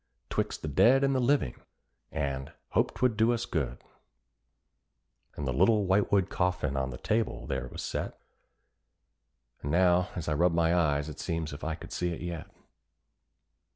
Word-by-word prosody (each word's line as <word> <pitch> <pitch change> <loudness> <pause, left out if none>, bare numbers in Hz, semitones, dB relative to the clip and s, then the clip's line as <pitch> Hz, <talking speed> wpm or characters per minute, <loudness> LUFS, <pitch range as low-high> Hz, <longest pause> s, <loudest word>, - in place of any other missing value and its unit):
"'Twixt - - -2
the - - -2
dead 120 - +5
and 135 0 +3
the 130 - +2
living," 130 - +1 0.5
and 70 -3 -3 0.2
"hoped - - +1
'twould 125 -3 +2
do 110 +2 +4
us 120 0 -1
good;" 65 -7 -2 1.6
And 70 - -4
the 65 - 0
little 105 - +4
whitewood 95 0 +3
coffin 90 -7 0
on 65 0 -1
the - - -6
table 110 0 -1
there - - -3
was - - -7
set, - - -4 1.4
And 70 - -4
now 90 +2 +3
as 85 - -4
I 75 - +1
rub 85 +3 +3
my 85 0 +3
eyes 75 -4 +2
it 75 -1 -8
seems 80 -3 -2
as 70 - -6
if - - -15
I 80 0 -1
could - - -11
see 90 - -1
it 85 - -5
yet. 85 -2 -5
85 Hz, 170 wpm, -29 LUFS, 75-105 Hz, 1.6 s, dead